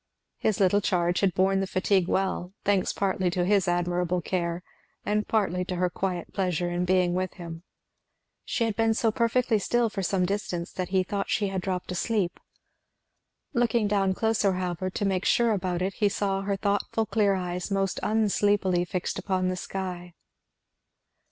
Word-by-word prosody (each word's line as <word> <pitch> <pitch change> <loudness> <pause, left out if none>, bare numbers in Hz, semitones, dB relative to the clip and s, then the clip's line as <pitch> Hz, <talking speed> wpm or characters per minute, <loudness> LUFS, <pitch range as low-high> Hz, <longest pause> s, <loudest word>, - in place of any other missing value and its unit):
His 215 -4 0
little 200 +1 +4
charge 175 -2 +1
had 190 -3 +1
borne 195 +1 +3
the 195 - -1
fatigue 185 -1 +1
well, 190 -1 -1
thanks 195 -2 +2
partly 190 -2 0
to 175 0 0
his 195 -1 +3
admirable 175 0 0
care, 170 0 -2 0.4
and 210 0 0
partly 190 -5 +1
to 180 - -3
her 180 0 0
quiet 180 -3 -3
pleasure 180 -3 0
in 175 +1 0
being 180 -1 +2
with 185 0 -2
him. 165 -2 -8 0.8
She 235 - -1
had 225 -2 0
been 225 0 +2
so 225 0 +2
perfectly 235 0 +2
still 235 +2 +1
for 195 - -3
some 185 0 +1
distance 180 -3 -3
that 185 -1 -4
he 190 -1 +2
thought 200 +1 -3
she 205 -2 +1
had 190 -1 -2
dropped 180 -1 -3
asleep. 185 0 -1 1.1
Looking 235 -3 +2
down 195 -2 +1
closer 220 -3 +2
however 180 0 -2
to 200 - -2
make 190 -1 0
sure 235 -1 +3
about 180 -3 -1
it 190 +1 -1
he 205 0 +2
saw 195 -1 -1
her 200 0 -1
thoughtful 205 +2 0
clear 205 -3 +2
eyes 180 0 -3
most 195 -1 0
unsleepily 205 -4 +2
fixed 180 0 -3
upon 185 -1 0
the 185 - -1
sky. 180 -2 -5
190 Hz, 170 wpm, -27 LUFS, 180-205 Hz, 1.1 s, little